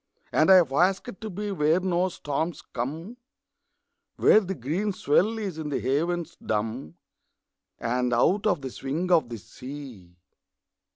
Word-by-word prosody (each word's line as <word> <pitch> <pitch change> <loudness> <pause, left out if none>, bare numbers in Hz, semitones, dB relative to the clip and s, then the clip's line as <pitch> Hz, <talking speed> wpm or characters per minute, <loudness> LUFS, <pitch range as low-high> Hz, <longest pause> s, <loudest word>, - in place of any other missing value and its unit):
And 155 - +3
I 190 - +9
have 165 -8 +4
asked 190 +5 +1
to 220 - -5
be 205 +2 -4
Where 160 -1 +2
no 185 0 +1
storms 160 0 -3
come, 160 - -5 1.0
Where - - +6
the 190 -2 -4
green 175 - -2
swell 195 +7 +2
is 195 -7 -4
in 155 -2 -4
the 145 - -1
havens 165 +5 -1
dumb, 105 -7 -3 0.8
And 125 +1 -1
out 190 - +2
of 175 -8 +1
the 130 -1 -5
swing 155 +9 -3
of 160 -8 +4
the 115 - -5
sea. 115 -4 -10
160 Hz, 150 wpm, -26 LUFS, 130-185 Hz, 1.0 s, I